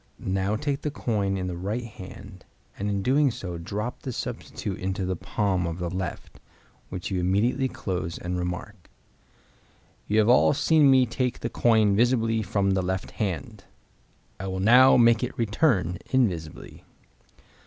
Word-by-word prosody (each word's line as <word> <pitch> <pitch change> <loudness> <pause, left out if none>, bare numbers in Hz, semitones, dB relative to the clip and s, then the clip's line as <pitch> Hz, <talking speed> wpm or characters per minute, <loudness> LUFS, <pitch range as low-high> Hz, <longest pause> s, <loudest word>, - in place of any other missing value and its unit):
Now 95 +2 0
take 140 +3 -2
the 150 - -2
coin 100 -8 -1
in 95 - -3
the 90 -1 -4
right 100 +7 -3
hand, 100 -3 -11 0.3
and 100 +1 -3
in 100 -1 -1
doing 140 +4 +3
so 90 -7 -6
drop 105 +7 -5
the 130 - -5
substitute 115 -5 -5
into 95 0 -2
the 95 0 -1
palm 95 -1 -1
of 85 0 -4
the 90 -1 -3
left, 95 -1 -5 0.5
which 90 +1 -5
you 95 - 0
immediately 100 +9 +1
close, 90 -8 -4
and 90 +1 -4
remark, 90 +2 -5 1.2
"You 105 - +1
have 110 -1 +4
all 125 +4 +5
seen 155 -1 +4
me 130 -1 +5
take 125 +1 -2
the 115 - -2
coin 110 -4 +3
visibly 115 -1 +2
from 100 -2 0
the 95 0 +1
left 95 +1 -3
hand. 95 -9 -4 0.7
I 95 - -5
will 95 0 -3
now 125 +7 +7
make 115 -1 +5
it 125 - -4
return 105 - +1
invisibly." 90 -12 -2
100 Hz, 160 wpm, -26 LUFS, 95-120 Hz, 1.2 s, now